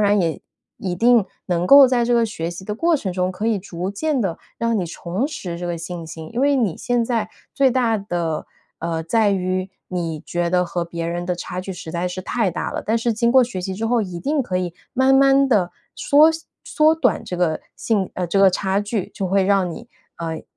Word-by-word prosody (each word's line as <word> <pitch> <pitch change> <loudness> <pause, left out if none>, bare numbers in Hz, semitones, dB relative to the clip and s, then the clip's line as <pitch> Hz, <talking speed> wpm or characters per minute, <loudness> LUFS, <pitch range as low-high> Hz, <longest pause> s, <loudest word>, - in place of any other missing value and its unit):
然 205 -1 +3
也 165 -3 -1 0.4
一 185 -2 -3
定 230 +2 +4 0.2
能 175 0 0
够 275 -1 +9
在 245 -2 +2
这 245 - +2
个 235 -1 +4
学 170 -7 -4
习 175 +2 -8
的 210 +2 -3
过 335 +6 +2
程 195 -10 -4
中， 180 0 0
可 205 +4 -3
以 225 -3 +2
逐 180 -1 -5
渐 295 +7 -1
地 185 -6 -2 0.2
让 230 -2 +1
你 175 - -2
重 180 +9 -3
拾 175 - -6
这 175 - -4
个 175 - -2
信 170 0 -6
心， 160 0 -9
因 235 - -2
为 280 0 +3
你 215 -10 +1
现 245 -1 0
在 225 -3 -1 0.3
最 270 -1 +4
大 235 -4 +1
的 175 -5 -3 0.3
呃， 165 0 -2
在 205 +5 +2
于 185 0 -1 0.2
你 165 -4 -3
觉 175 0 -1
得 180 0 +2
和 175 0 -3
别 170 -1 -4
人 175 +1 -3
的 180 - 0
差 180 +1 -5
距 190 - -7
实 170 -2 -8
在 175 +1 -1
是 185 +1 -6
太 220 -1 0
大 175 - -3
了， - - -3
但 220 - +1
是 230 0 0
经 235 +2 +1
过 260 0 +6
学 230 -6 -5
习 190 +1 -4
之 220 +4 -4
后， 240 0 +2
一 180 -5 -4
定 290 - 0
可 185 -6 -2
以 180 -2 -2 0.2
慢 265 +1 +4
慢 275 0 +5
地 195 -7 +2 0.2
缩 300 +3 +5 0.3
缩 310 0 +3
短 320 - +1
这 180 - -5
个 170 -3 0 0.2
信 205 -5 0
呃， 180 - -2
这 185 +4 0
个 195 -1 +7
差 190 +2 0
距， 205 -2 -3
就 195 - -2
会 195 +1 +2
让 195 -2 +2
你 230 +8 -9 0.3
呃， 165 -1 -4
195 Hz, 250 characters per minute, -21 LUFS, 175-235 Hz, 0.4 s, 够